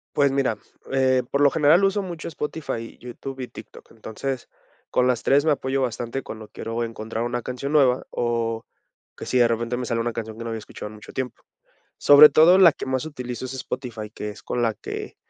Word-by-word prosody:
Pues 140 -2 +4
mira, 135 -1 0 0.3
eh, 130 -1 +3
por 140 - +1
lo 140 - +7
general 160 +5 +4
uso 195 +1 +2
mucho 175 -4 -6
Spotify, 150 -7 -5
YouTube 130 +2 -8
y 125 - -4
TikTok. - - -13
Entonces, 120 +4 -5 0.4
con 125 0 +3
las 125 -2 0
3 140 +2 +4
me 155 - +3
apoyo 135 -1 0
bastante 120 +1 -2
cuando 110 -2 -9
quiero 115 +1 -4
encontrar 115 0 -4
una 120 0 -2
canción 125 +4 -5
nueva 130 -4 +3
o 115 -1 -1 0.5
que - - -7
si 130 - +1
de 120 - +6
repente 115 +1 -1
me 125 -1 -4
sale 115 -1 0
una 120 0 -2
canción 110 -1 -6
que 115 - -6
no 115 - -4
había 110 - -3
escuchado 105 - -8
en 110 - -12
mucho 105 - -13
tiempo. 130 -2 -4 0.6
Sobre 145 +1 +9
todo 165 +6 +6
la 180 -4 +8
que - - -7
más 130 +2 -1
utilizo 125 -4 -6
es 130 - -6
Spotify, 125 -5 -5
que 105 -1 -6
es 105 - -13
con 120 -1 -2
la 115 -2 +2
que, - - -7
125 Hz, 210 wpm, -24 LUFS, 115-140 Hz, 0.6 s, Sobre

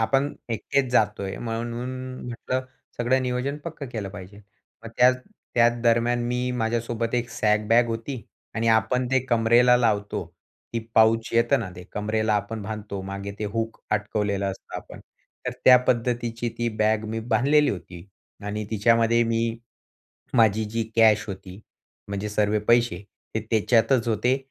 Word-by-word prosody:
आपण 135 +5 +1 0.2
एकटेच 135 +4 0
जातोय 100 -4 +1
म्हणून 120 +1 -4
न 130 0 -7
म्हटलं, 130 +2 -3 0.3
सगळं 130 +2 +2
नियोजन 125 +3 -2
पक्कं 160 -4 -6
केलं 110 -5 -5
पाहिजे. 100 +1 -10 0.4
मग - - -6
त्या 125 +1 +7 0.4
त्याच 120 0 +3
दरम्यान 120 +1 +2
मी 125 +1 -1
माझ्यासोबत 115 0 -1
एक 120 -1 0
सॅक 105 -1 +1
बॅग 120 +1 +5
होती 115 +2 -4 0.3
आणि 115 0 0
आपण 125 +3 +2
ते 130 - +4
कमरेला 120 +1 +5
लावतो 105 -6 0 0.5
ती 115 - 0 0.2
पाऊच 110 0 +4
येतं 115 0 +3
ना 105 - -4
ते, 90 - -8
कमरेला 110 +1 0
आपण 105 +1 -2
बांधतो 105 -1 -5
मागे 100 +1 -6
ते 105 - -3
हूक 115 0 -3
अटकवलेलं 105 -1 -1
असतं 95 - -9
आपण. - - -10 0.5
तर - - +1
त्या 125 - +9
पद्धतीची 120 -1 0
ती 120 0 0
बॅग 110 0 +2
मी 115 +1 -3
बांधलेली 145 +6 +3
होती 90 -1 -8 0.4
आणि 105 +1 -3
तिच्यामध्ये 115 +2 +3
मी 115 0 0 0.8
माझी 110 -1 +4
जी 115 +1 -1
कॅश 110 -2 +5
होती 95 0 -8 0.5
म्हणजे 100 +1 -3
सर्व 105 0 +1
पैसे 115 -6 +3 0.3
ते 110 - 0
त्याच्यातच 115 +2 +3
होते. 120 +4 +2
115 Hz, 150 wpm, -25 LUFS, 105-120 Hz, 0.8 s, त्या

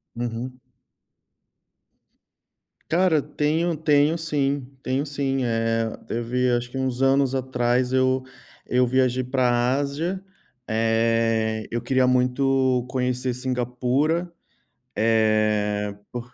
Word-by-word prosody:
Uhum. 120 +2 -5 2.3
Cara, 170 -2 +3
tenho 155 +4 -1
tenho 150 0 +3
sim. 145 -4 -1 0.2
Tenho 130 +3 -1
sim, 140 -2 -1
eh, 115 -1 -1
teve 125 +2 -1
acho 120 0 -1
que 135 - -7
uns 130 -1 -2
anos 135 0 +3
atrás. 125 -1 0
Eu 130 0 +2 0.4
eu 125 0 +3
viajei 130 0 +1
pra 130 0 +1 0.3
Ásia. 160 +7 -3 0.4
Eh, 115 -1 +1
eu 120 0 -2
queria 130 +2 +2
muito 130 0 +2
conhecer 125 -1 -1
Singapura, 130 +7 -1 0.6
eh, 110 -2 +1 0.2
por 120 0 -7
125 Hz, 100 wpm, -24 LUFS, 120-135 Hz, 2.3 s, Cara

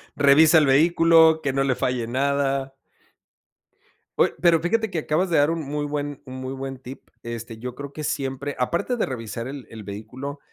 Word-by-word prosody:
Revisa 145 +3 +6
el 155 - +5
vehículo, 160 +2 +5
que 135 -3 -1
no 135 0 +1
le 130 -2 +1
falle 125 -2 -1
nada. 135 +1 -1 1.5
Oye, - - +3
pero 170 -2 +5
fíjate 220 +6 0
que 165 - -1
acabas 160 +5 0
de 170 - +2
dar 145 +2 +4
un 165 -1 -2
muy 145 +1 -3
buen 145 -1 -4
un 130 0 -9
muy 130 0 -5
buen 135 0 -6
tip, 130 +1 -12
este, 115 -1 -7
yo 125 +2 -6
creo 140 +2 -9
que 155 - -6
siempre 140 0 -3
aparte 170 - -1
de - - +1
revisar 115 -2 -6
el 135 -2 -8
el 110 -3 -10
vehículo, 125 +8 -7
140 Hz, 190 wpm, -23 LUFS, 130-155 Hz, 1.5 s, Revisa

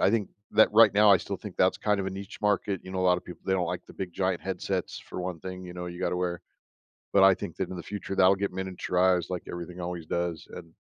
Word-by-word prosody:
I - - +4
think 110 -3 0 0.2
that, 110 - +6
right 110 -2 +7
now, 105 0 +6
I 100 - +8
still 100 +2 -5
think 100 -1 -9
that's 95 0 +3
kind 105 -1 +1
of 95 - -3
a - - -2
niche 100 +2 -8
market. 100 -2 +1
You 95 - -8
know, 95 - -2
a - - +1
lotta 90 -1 +3
people, 90 - -11
they 95 - 0
don't 90 -2 +1
like - - -4
the - - -13
big 95 -2 -5
giant 95 0 0
headsets 95 -1 -3
for - - -7
one 90 -2 -4
thing, 95 +1 -7
you 90 - -9
know, 90 0 -5
you 85 0 -7
gotta - - 0
wear 90 -1 -2 0.7
but 100 - +5
I 95 0 +7
think 85 - -7
that 95 - -3
in 95 - -5
the 85 - -6
future, 100 0 -5
that'll 95 0 +6
get 100 0 -2
miniaturized, 90 -1 0
like 90 -1 -3
everything 85 +1 -7
always 85 -1 -4
does, 85 0 -2
and 85 -2 -10
95 Hz, 270 wpm, -28 LUFS, 90-95 Hz, 0.7 s, I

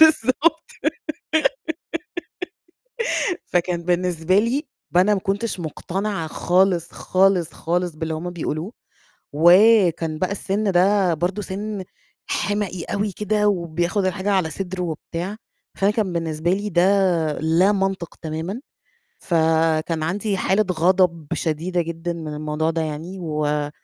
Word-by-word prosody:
بالضبط، 315 +2 +4 2.8
فكان 175 -1 0
بالنسبة 180 +1 +2
لي 250 +7 0 0.3
ب 175 - +1
أنا 200 +3 +5
ما 195 - 0
كنتش 195 +1 -2
مقتنعة 180 +2 -3
خالص، 180 0 +2
خالص، 185 -3 +2
خالص 175 +1 -1
باللي 160 0 -3
هُم 165 +3 -4
بيقولوه، 170 +1 -4 0.6
وكان 175 -1 +5
بقى 185 +4 0
السِن 200 0 -1
ده 185 -1 +3
برضه 180 +6 -1
سِن 200 +1 -4 0.4
حِمَقي 205 -4 -1
أوي 205 0 -2
كده، 210 +2 +1
وبياخد 175 +1 0
الحاجة 190 +2 -1
على 185 -5 +2
صدره 185 +3 -4
وبتاع، 175 +4 -4 0.4
فأنا 195 +1 +3
كان 210 -4 -1
بالنسبة 165 0 -1
لي 205 +2 -1
ده 175 -3 +2 0.6
لا 170 +6 +3
منطق 195 -3 -1
تمامًا، 160 +8 -4 0.6
فكان 160 -1 +1
عندي 195 +4 -1
حالة 195 +3 +2
غضب 175 -2 +2
شديدة 170 +3 -1
جدًا 170 +1 -4
من 160 -2 -6
الموضوع 150 +1 -1
ده 165 0 -1
يعني، 160 +5 -5
و 150 -2 -1
180 Hz, 120 wpm, -22 LUFS, 165-195 Hz, 2.8 s, أنا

